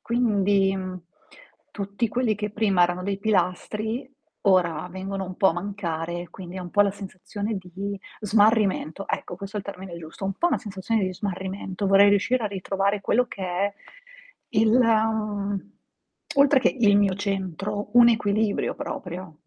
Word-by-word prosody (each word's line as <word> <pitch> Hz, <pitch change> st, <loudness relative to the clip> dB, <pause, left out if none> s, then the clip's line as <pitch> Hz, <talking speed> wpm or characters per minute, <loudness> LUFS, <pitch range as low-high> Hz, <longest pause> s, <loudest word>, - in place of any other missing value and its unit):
Quindi 205 Hz, -5 st, +2 dB, 1.0 s
tutti 200 Hz, +3 st, -2 dB
quelli 235 Hz, -1 st, +1 dB
che 210 Hz, +1 st, -4 dB
prima 200 Hz, -4 st, +2 dB
erano 175 Hz, +1 st, +1 dB
dei 195 Hz, +1 st, -2 dB
pilastri 215 Hz, +5 st, -1 dB, 0.3 s
ora 180 Hz, -4 st, +2 dB
vengono 190 Hz, +1 st, -4 dB
un 185 Hz, 0 st, -8 dB
po' 190 Hz, -2 st, +5 dB
a -, -, +2 dB
mancare, 175 Hz, -3 st, -4 dB
quindi 180 Hz, 0 st, -9 dB
è -, -, -4 dB
un 175 Hz, -1 st, -7 dB
po' 205 Hz, -, +3 dB
la 200 Hz, -, +2 dB
sensazione 200 Hz, +2 st, -5 dB
di 190 Hz, +2 st, -6 dB, 0.2 s
smarrimento. 205 Hz, -4 st, +2 dB
Ecco, 175 Hz, -, -3 dB
questo 200 Hz, +3 st, -7 dB
è -, -, 0 dB
il -, -, -15 dB
termine 190 Hz, -3 st, -7 dB
giusto, 160 Hz, +4 st, -9 dB
un 195 Hz, -, 0 dB
po' 345 Hz, -, +1 dB
una -, -, +2 dB
sensazione 205 Hz, +1 st, -2 dB
di 185 Hz, -1 st, -1 dB
smarrimento. 190 Hz, 0 st, -4 dB
Vorrei 195 Hz, +1 st, +7 dB
riuscire 225 Hz, +4 st, +2 dB
a -, -, +2 dB
ritrovare 195 Hz, +1 st, -1 dB
quello 245 Hz, +5 st, +2 dB
che 195 Hz, -, -8 dB
è 190 Hz, +3 st, -1 dB, 0.8 s
il, 220 Hz, -3 st, +3 dB
mhmm, 215 Hz, -4 st, +1 dB, 0.7 s
oltre 280 Hz, -1 st, +6 dB
che -, -, +2 dB
il 205 Hz, -4 st, +5 dB
mio 200 Hz, -2 st, +3 dB
centro, 195 Hz, +1 st, -3 dB
un 235 Hz, -, +9 dB
equilibrio, 215 Hz, -2 st, +1 dB
proprio. 180 Hz, -2 st, -6 dB
200 Hz, 155 wpm, -25 LUFS, 185-215 Hz, 1.0 s, un